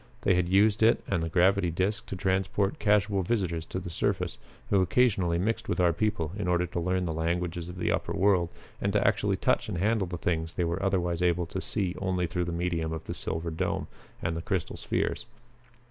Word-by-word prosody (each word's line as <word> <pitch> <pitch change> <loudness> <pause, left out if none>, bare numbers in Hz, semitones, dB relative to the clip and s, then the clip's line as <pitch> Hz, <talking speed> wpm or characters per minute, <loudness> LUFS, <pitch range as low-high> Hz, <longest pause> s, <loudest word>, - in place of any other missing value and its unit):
They 95 - +3
had 90 -1 +1
used 100 +3 +4
it 115 +1 +4
and 90 -4 0
the 80 - -2
gravity 95 +1 +3
disc 95 +5 -1
to - - -4
transport 95 - 0
casual 105 -3 +2
visitors 90 -5 -1
to - - -4
the 90 -2 -5
surface, - - -1 0.3
who 100 -2 +5
occasionally 95 -3 +2
mixed 110 +6 -1
with - - 0
our 90 -2 +4
people 85 -4 -1
in 100 -3 -3
order 90 0 +2
to 85 0 -4
learn 90 +1 0
the 80 - -2
languages 85 +1 -2
of 90 - -8
the - - 0
upper - - -1
world 95 -4 +3 0.3
and - - +1
to - - +3
actually - - +2
touch - - +1
and - - -3
handle 105 +1 +1
the 90 0 -4
things 80 -1 -2
they 90 - +1
were 85 +3 -2
otherwise 90 -3 0
able 90 -1 +2
to 95 +3 -5
see 95 -5 -1
only 95 -2 0
through 85 +2 -2
the 85 - -3
medium 85 -2 -1
of 80 0 -4
Silver 80 +1 -3
Dome 80 - -1 0.4
and 85 - -1
the 80 - -3
crystal 95 -1 -2
spheres. - - -2
90 Hz, 210 wpm, -28 LUFS, 85-95 Hz, 0.4 s, who